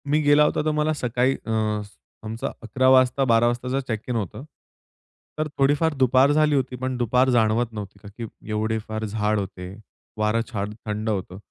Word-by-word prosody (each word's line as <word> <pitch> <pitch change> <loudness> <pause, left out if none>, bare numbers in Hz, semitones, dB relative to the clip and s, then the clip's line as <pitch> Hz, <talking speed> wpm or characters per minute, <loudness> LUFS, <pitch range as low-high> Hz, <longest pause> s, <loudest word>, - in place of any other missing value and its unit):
मी 150 +2 +3
गेला 145 0 +5
होता - - +1
तर 155 - +2
मला 155 +1 +1
सकाळी 125 -1 0
अ, 115 - -4 0.7
आमचा 110 +1 -4
11 130 +3 0
वाजता 130 +1 +4
12 115 +1 +4
वाजताचा 125 +2 -1
चेक 110 -3 -2
इन 125 - -1
होतं. 110 +2 -4 0.9
तर 155 0 -1
थोडीफार 145 +4 +2
दुपार 130 +2 +4
झाली 150 0 +3
होती 130 -2 -1
पण 130 0 -3
दुपार 125 +2 +2
जाणवत 115 -1 +2
नव्हती 100 -2 -8
का - - -10
की 115 - -4 0.2
एवढे 110 +1 -1
फार 110 0 -3
झाड 105 0 0
होते, 95 -1 -6 0.4
वारं 110 +2 +1
छान 105 -1 -3
थंड 105 +1 -3
होतं. 95 -3 -3
120 Hz, 175 wpm, -24 LUFS, 110-130 Hz, 0.9 s, गेला